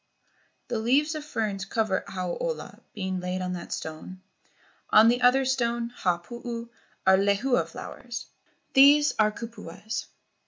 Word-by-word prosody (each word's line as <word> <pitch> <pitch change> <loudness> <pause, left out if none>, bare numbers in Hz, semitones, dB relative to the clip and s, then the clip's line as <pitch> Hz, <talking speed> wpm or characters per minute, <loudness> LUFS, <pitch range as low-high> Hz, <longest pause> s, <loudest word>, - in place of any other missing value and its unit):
The 235 - -1
leaves 280 +7 +2
of 310 -1 -5
ferns 215 -9 -2
cover 205 -1 0
Hau 185 -2 -3
ola, - - -4 0.2
being 190 -2 -2
laid 180 +1 -3
on 180 0 -2
that 175 -1 -7
stone. 160 +4 -6 0.7
On 220 +2 +7
the 245 +1 +1
other 255 +2 +5
stone, 235 -2 0
Ha 180 -7 0
puu, 235 +5 -7 0.4
are 190 0 +6
lehua 200 +6 +2
flowers. 240 -2 -7 0.5
These 290 +2 +7
are 215 0 +4
kupuas." 220 -2 -6
225 Hz, 135 wpm, -27 LUFS, 190-245 Hz, 0.7 s, On